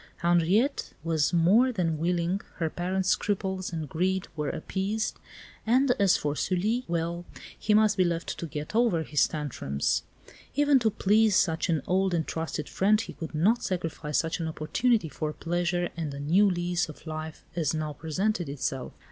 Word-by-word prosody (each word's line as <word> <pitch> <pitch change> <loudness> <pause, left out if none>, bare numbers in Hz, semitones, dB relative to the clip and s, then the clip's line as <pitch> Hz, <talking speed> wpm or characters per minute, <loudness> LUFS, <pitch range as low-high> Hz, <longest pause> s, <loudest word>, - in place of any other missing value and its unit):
Henriette 175 - +2
was 160 -2 +1
more 195 +10 +4
than 165 -8 -1
willing, 175 +3 0
her 160 -3 -2
parents' 185 +1 -1
scruples 190 -2 -1
and 160 -3 -4
greed 185 +5 -1
were 150 -2 -2
appeased, 200 +6 -2 0.4
and 255 +4 +3
as 195 -2 +5
for 145 0 -2
Sully 210 +10 0
well, 170 0 -2 0.3
he 210 -1 +1
must 215 -1 +4
be 185 - +5
left 170 -1 -2
to 170 - -4
get 150 +2 -6
over 225 -9 +3
his 150 -2 +2
tantrums. 125 - -1 0.5
Even 290 -2 +4
to 225 -2 +2
please 215 0 +3
such 160 +1 +2
an 160 -5 +1
old 190 0 +1
and 160 -2 0
trusted 160 -2 -4
friend 210 +3 +3
he - - -7
could 160 -2 -7
not 205 +10 +3
sacrifice 165 -4 -2
such 165 +1 0
an 165 - -2
opportunity 165 +7 +1
for 155 0 -4
pleasure 175 +1 -1
and 160 -3 -3
a - - -6
new 180 +8 +4
lease 175 -1 -1
of 155 - -12
life 155 0 -6
as 160 -3 0
now 155 -1 -2
presented 175 +3 -1
itself! 135 -2 -3
175 Hz, 170 wpm, -28 LUFS, 160-200 Hz, 0.5 s, as